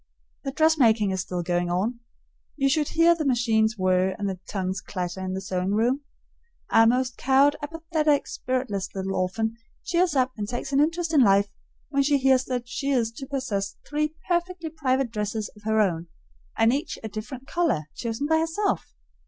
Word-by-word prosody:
The 270 - -3
dressmaking 260 -9 +3
is 190 -1 -1
still 180 -2 -4
going 175 0 0
on. 205 +7 -1 0.6
You 275 -2 +2
should 295 +1 +2
hear 335 +1 +5
the 330 -2 -3
machines 230 -4 +2
whir 185 0 +2
and 205 -2 -2
the 190 -2 -4
tongues 185 -1 -2
clatter 185 0 -4
in 185 0 -3
the 190 - -3
sewing 185 0 -2
room. 245 +6 +2 0.7
Our 225 0 +6
most 250 +1 +1
cowed, 275 +3 +4
apathetic, 310 -1 0
spiritless 250 -7 -2
little 195 0 -2
orphan 220 +5 -1 0.3
cheers 345 -2 +1
up 260 -1 +2
and 210 -2 -4
takes 250 +3 -4
an 275 - +4
interest 330 +2 +1
in 290 - +6
life 200 -2 +4 0.4
when 280 -1 +2
she 285 +1 +3
hears 265 -1 +3
that 245 -1 -3
she 275 +3 -3
is 240 -5 +1
to 265 +4 -8
possess 255 -8 -2
three 300 +1 -1
perfectly 345 -2 -1
private 265 -5 0
dresses 210 0 -3
of 210 - -16
her 220 0 +2
own, 175 -5 +1 0.5
and 225 +2 +4
each 290 +5 -2
a - - -3
different 220 +5 -7
color, 335 - +1
chosen 230 +3 -3
by 320 +1 +3
herself. 330 +6 -1
245 Hz, 180 wpm, -25 LUFS, 200-290 Hz, 0.7 s, Our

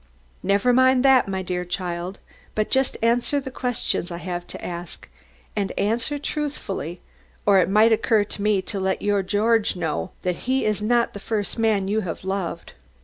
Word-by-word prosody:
"Never 200 +5 +3
mind 260 +1 +4
that, 265 -4 +6
my 190 -1 -2
dear 180 0 -2
child, 180 +1 -4 0.4
but 215 0 0
just 265 0 +2
answer 240 +5 +2
the 265 -1 -7
questions 245 -8 -1
I 170 - -5
have 175 0 -5
to - - -8
ask, 175 0 -6 0.5
and 200 -3 -1
answer 230 +8 +1
truthfully, 275 - -4 0.4
or 200 -2 +6
it 180 - +2
might 215 +3 +5
occur 220 -1 +3
to 205 - -6
me 205 -2 +2
to 195 +2 -4
let 190 0 -1
your 205 -1 +2
George 210 +3 +2
know 170 0 -2
that 180 -1 0
he 265 +1 +2
is 210 -1 0
not 235 +2 +2
the 205 - -7
first 210 +2 -3
man 215 -4 +2
you 210 +2 +1
have 185 -5 -5
loved." 190 -3 -3
205 Hz, 180 wpm, -23 LUFS, 185-235 Hz, 0.5 s, that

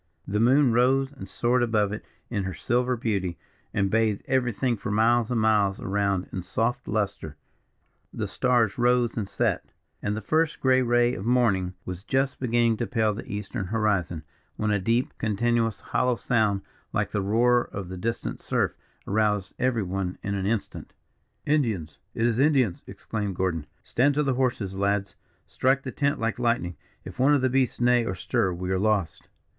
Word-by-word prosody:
The 105 +2 0
moon 130 +2 +4
rose 135 +3 +3
and 140 - -10
soared 120 +1 +1
above 105 -4 +1
it 105 - -6 0.3
in 100 -5 -1
her 95 -2 -4
silver 125 - 0
beauty, 100 -7 -1 0.3
and 100 -1 0
bathed 110 -2 +1
everything 125 -1 +1
for 100 - -6
miles 115 +2 +3
and 120 -2 +1
miles 105 -3 +2
around 100 -1 0
in 95 - -3
soft 115 +7 -2
lustre 100 -8 -2 0.7
the - - -3
stars 120 -4 +1
rose 120 -1 +3
and 105 -4 -2
set - - -1 0.3
and 105 +1 -1
the - - -1
first 155 +6 0
grey 130 -1 +4
ray 120 0 +3
of 95 - -5
morning 105 -7 +2
was 90 0 -6
just 135 +3 0
beginning 120 -2 +2
to 120 - -2
pale 110 -3 +1
the 105 - -8
eastern 100 -2 -4
horizon, 100 -6 0 0.3
when 105 0 -1
a 105 - +2
deep, 115 +6 0
continuous, 115 +1 0
hollow 125 -1 0
sound, 110 -4 +1 0.3
like - - -1
the 105 - 0
roar 120 +5 +3
of 95 -2 -7
the 95 - -6
distant 115 +5 -3
surf, - - 0 0.3
aroused 105 -2 0
every 125 -4 +1
one 95 0 -3
in 100 - -2
an 95 -1 -1
instant. 110 -1 -3 0.5
"Indians! 115 - 0 0.2
it 115 - +1
is 120 0 +1
Indians!" 135 - +3
exclaimed 105 -4 -4
Gordon. 85 -5 -1 0.2
"Stand 140 +3 +2
to 150 - +2
the 135 -2 +1
horses, 120 -7 -1
lads. 100 0 0 0.3
Strike 135 +2 +1
the 130 - -5
tent 140 +2 0
like 115 +1 -1
lightning. 115 -8 0 0.3
If - - -9
one 140 +3 +5
of 140 - +1
the 130 - +2
beasts 130 -1 +1
neigh 120 0 +4
or 95 -5 -3
stir, 90 +1 0
we 90 +1 -4
are 95 - +1
lost." 105 -4 0
115 Hz, 180 wpm, -26 LUFS, 100-125 Hz, 0.7 s, one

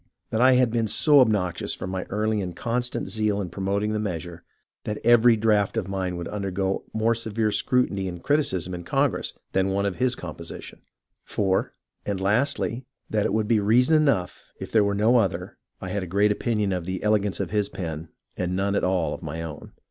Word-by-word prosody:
That 110 - 0
I 130 +1 +6
had 125 -2 +3
been 115 -1 0
so 145 +7 +5
obnoxious 100 -8 +1
for - - -6
my 95 0 -4
early 105 +1 -1
and 90 -3 -5
constant 120 +3 -2
zeal 105 -2 0
in 90 -4 -4
promoting 100 +3 -1
the 105 - -1
measure, 85 -4 -5 0.4
that 105 - -3
every 120 0 +6
draft 105 -1 +2
of 105 -5 -1
mine 95 -2 -3
would 85 - -5
undergo 95 -1 -2
a - - -5
more 115 +1 +3
severe 110 -1 -1
scrutiny 100 -4 +1
and 90 -2 -7
criticism 95 - 0
in 90 -1 -6
Congress - - 0
than 95 0 +1
one 100 +1 0
of 100 -3 -2
his 125 -1 +2
com 85 -4 -7
position. 85 - -9 0.4
4. 95 -2 -1 0.3
And 100 -2 -3
lastly, 110 +7 +1
and 125 +3 -7 0.3
that 105 -1 +1
would 110 -1 0
be 115 -1 +3
reason 125 +9 +4
enough 140 -13 +1 0.2
if - - -7
there 110 -2 +4
were 100 0 0
no 110 +5 +4
other, 100 -7 -1 0.2
I 95 - -6
had 100 +2 -2
a 90 - -5
great 100 +4 +2
opinion 105 -2 0
of 90 -2 -3
the 95 0 -4
ele 105 0 +4
gance 100 -1 -3
of 95 -3 -3
his 105 -1 0
pen 80 -2 -6 0.3
and 90 0 -2
none 100 +1 0
at 100 - 0
all 90 -3 +1
of - - -7
my 80 0 -5
own. 80 -3 -8
100 Hz, 210 wpm, -25 LUFS, 95-110 Hz, 0.4 s, I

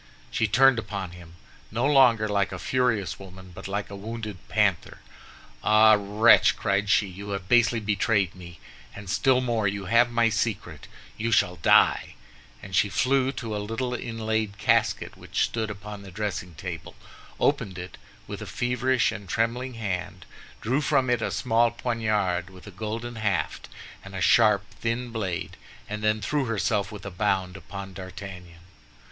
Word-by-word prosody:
She 115 - +1
turned 130 +3 +5
upon 100 -5 -5
him, 85 -1 -13 0.3
no 115 +4 -1
longer 125 -6 +5
like 100 -1 0
a - - -5
furious 125 -7 0
woman, 95 -1 -12
but 95 +3 -8
like 100 +1 -3
a - - -6
wounded 105 -1 -6
panther. - - +1 0.7
"Ah, 110 0 +6
wretch!" 105 +3 +5
cried 100 0 0
she, 105 - +4
"you 100 +2 -9
have 100 -2 -4
basely 120 +1 +4
betrayed 105 -2 +1
me, 85 -3 -12 0.4
and 105 -1 -9
still 130 +1 +3
more, 115 -4 0
you 100 0 -3
have 115 +5 +4
my 115 -1 +3
secret! 110 -1 -3 0.3
You 115 +2 -1
shall 90 -5 +2
die." 80 - +4 0.5
And 95 -1 -6
she 100 +3 +3
flew 130 +5 +2
to 115 -5 -5
a 105 - -2
little 115 +4 -3
inlaid 110 -3 -2
casket - - +1
which - - -1
stood 110 -1 -3
upon 105 0 -8
the 100 - -11
dressing 90 -3 -4
table, 85 +1 -7 0.4
opened 95 -2 0
it 90 0 -8 0.3
with - - -7
a - - -6
feverish 125 +1 +1
and 100 -4 -8
trembling 120 +4 -1
hand, 90 -4 -4 0.4
drew 130 +6 0
from 135 -3 +2
it 120 -2 +1
a - - -1
small 115 -1 +2
poniard, 105 -6 -1
with 95 -1 -14
a 100 - -9
golden 115 +4 -5
haft 105 -4 -2 0.3
and 95 0 -10
a - - -3
sharp 105 +1 +5 0.2
thin 120 +1 -2
blade, 95 -5 -4 0.3
and 105 0 -5
then 110 0 +1
threw 145 +6 0
herself 105 -2 0
with 105 -3 -9
a 100 - -5
bound 95 -1 -1
upon 95 0 -8
D'Artagnan. 95 -2 -9
105 Hz, 165 wpm, -26 LUFS, 95-115 Hz, 0.7 s, Ah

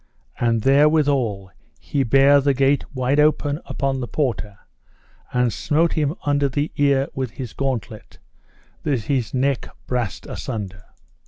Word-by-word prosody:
And 115 -2 +1
therewithal 135 - +2 0.3
he 140 - -2
bare 135 +3 +5
the 140 0 +2
gate 135 +2 +2
wide 130 +2 0
open 150 0 +2
upon 135 0 -1
the 125 - -4
porter, 115 -9 -2 0.7
and 125 -2 +1
smote 160 +3 +1
him 150 -1 0
under 145 -1 +2
his 145 +3 -1
ear 140 -1 +2
with 130 -2 -3
his 130 -3 -7
gauntlet, 115 -6 -4 0.6
that 140 -6 0
his 125 -2 -1
neck 135 0 0 0.2
brast 120 -5 -3
a - - -7
sunder. 100 -2 -6
135 Hz, 140 wpm, -22 LUFS, 120-145 Hz, 0.7 s, bare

